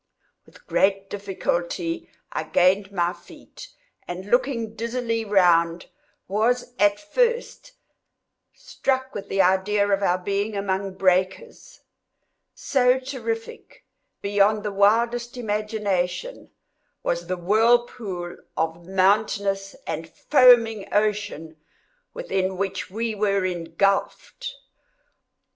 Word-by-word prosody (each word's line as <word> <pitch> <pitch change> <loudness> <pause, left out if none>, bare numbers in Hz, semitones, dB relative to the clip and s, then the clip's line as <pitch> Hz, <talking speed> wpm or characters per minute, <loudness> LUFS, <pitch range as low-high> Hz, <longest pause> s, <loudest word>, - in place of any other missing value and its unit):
With - - -20
great 195 0 +1
difficulty 205 - -3 0.2
I - - -2
gained 190 +2 +2
my 175 -2 0
feet, - - -14 0.4
and 185 +3 -7
looking 245 -3 +1
dizzily 230 0 -2
around, 175 -4 +3 0.4
was, 235 +5 0
at 205 0 +4
first, 475 +9 -1 0.8
struck 260 -1 -2
with 200 - -7
the 195 - +3
idea 200 +2 +2
of 200 -1 +1
our 180 -2 +2
being 200 +3 -2
among 195 -1 -2
breakers; 185 0 -1 0.7
so 255 -2 +2
terrific, 230 -4 -6 0.4
beyond 205 +1 +2
the 210 - -2
wildest 235 +4 +2
imagination, 210 - -2 0.5
was 170 0 -2
the 185 0 -2
whirlpool 210 -2 +1 0.2
of 165 +1 -2
mountainous 195 0 +1
and 165 +1 -5
foaming 235 -6 +4
ocean 205 -7 -1 0.5
within 190 - -2
which 195 0 -3
we 225 +3 -2
were 200 -2 +1
engulfed. 185 - -1
205 Hz, 100 wpm, -24 LUFS, 190-230 Hz, 0.8 s, at